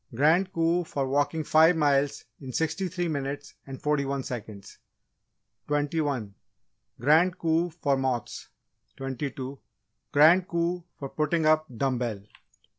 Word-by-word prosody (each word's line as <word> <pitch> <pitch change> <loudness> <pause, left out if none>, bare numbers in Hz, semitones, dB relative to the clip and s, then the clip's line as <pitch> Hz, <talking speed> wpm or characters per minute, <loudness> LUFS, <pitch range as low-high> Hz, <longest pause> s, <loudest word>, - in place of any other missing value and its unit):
Grand 165 +8 +3
Coup 170 0 +1
for 140 -4 -3
Walking 145 +3 0
Five 160 +3 +5
Miles 145 -2 +1
in 130 -3 -8
Sixty 160 - -1
three 175 0 -2
Minutes 145 -2 -4
and 135 -1 -7
Forty 150 -1 +1
one 140 0 -2
Seconds 105 -5 -8 0.9
21. 145 -7 -1 0.7
Grand 160 +7 +4
Coup 165 +1 +1
for 155 -4 0
Moths 130 -3 -3 0.5
22. 135 0 -5 0.5
Grand 165 +5 +6
Coup 170 +1 -1
for 140 - -5
Putting 155 +2 0
Up 155 0 +3
Dumb 130 -2 0
bell 120 -3 -1
23. 100 +1 -18
145 Hz, 130 wpm, -27 LUFS, 135-165 Hz, 0.9 s, Grand